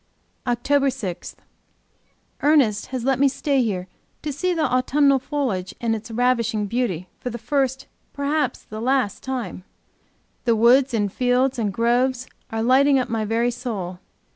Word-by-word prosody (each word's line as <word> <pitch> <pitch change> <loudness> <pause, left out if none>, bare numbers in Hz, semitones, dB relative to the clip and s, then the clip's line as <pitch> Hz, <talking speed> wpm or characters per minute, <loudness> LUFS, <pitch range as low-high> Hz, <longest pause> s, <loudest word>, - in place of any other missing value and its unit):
OCTOBER 275 +4 +2
6. 210 -10 -5 1.1
Ernest 280 -8 +3
has 255 -2 -4
let 265 0 +1
me 280 - +5
stay 275 0 +1
here 190 -6 -2 0.4
to 300 -2 -3
see 365 +6 -1
the 330 -3 0
autumnal 275 +2 +3
foliage 250 -10 -3
in 230 -1 0
its 225 +2 -5
ravishing 230 -2 +1
beauty 200 -6 -2
for 250 - -4
the 235 - -5
first, 265 +2 -1 0.3
perhaps 285 -2 -1
for - - -35
the 215 0 -5
last, 255 -4 0
time. 245 -9 -4 0.8
The 235 -2 +3
woods 245 +3 +4
and 205 -3 0
fields 250 +1 +1
and 210 -3 0
groves 245 +4 +1 0.2
are 225 0 -2
lighting 270 +3 +5
up 255 - -1
my 225 -1 -1
very 230 +3 +1
soul! 210 -8 -5
245 Hz, 155 wpm, -23 LUFS, 225-270 Hz, 1.1 s, me